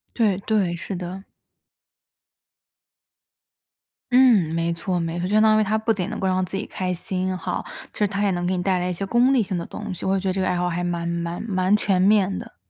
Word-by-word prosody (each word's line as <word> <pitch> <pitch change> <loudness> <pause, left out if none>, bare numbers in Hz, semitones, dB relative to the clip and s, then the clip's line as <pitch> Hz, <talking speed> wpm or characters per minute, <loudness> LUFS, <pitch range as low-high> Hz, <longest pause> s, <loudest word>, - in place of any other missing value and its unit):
对， 210 -6 +2
对， 200 -4 0
是 180 +3 -6
的。 185 +2 -6 2.9
嗯， 225 -11 +5
没 165 0 0
错， 175 +2 -2
没 165 +1 -3
错， 180 - -2
相 210 +2 +3
当 215 0 +5
于 - - +3
它 215 +2 +1
不 220 +1 0
仅 200 -3 -1
能 220 - -5
够 190 - -1
让 185 0 +1
自 190 - -7
己 - - -3
开 185 -1 -3
心 185 +1 -2
哈， 165 - -3 0.3
其 - - -11
实 210 - +3
它 200 +1 -2
也 200 - +2
能 175 0 -1
给 185 - 0
你 180 - -2
带 185 -1 +1
来 180 +1 -1
一 180 - -1
些 195 +3 -4
功 245 +5 +3
利 245 -5 +3
性 185 -1 -3
的 170 - -4
东 - - -6
西， 180 - -7
我 190 - +2
也 195 - +1
觉 190 0 -2
得 - - 0
这 190 - -3
个 185 - +1
爱 180 - +1
好 180 0 0
还 175 +1 -2
蛮 175 -1 -2
蛮 170 +2 -3
蛮 190 -2 +1
全 195 -3 +1
面 195 -1 +3
的。 - - -11
185 Hz, 260 characters per minute, -23 LUFS, 175-205 Hz, 2.9 s, 嗯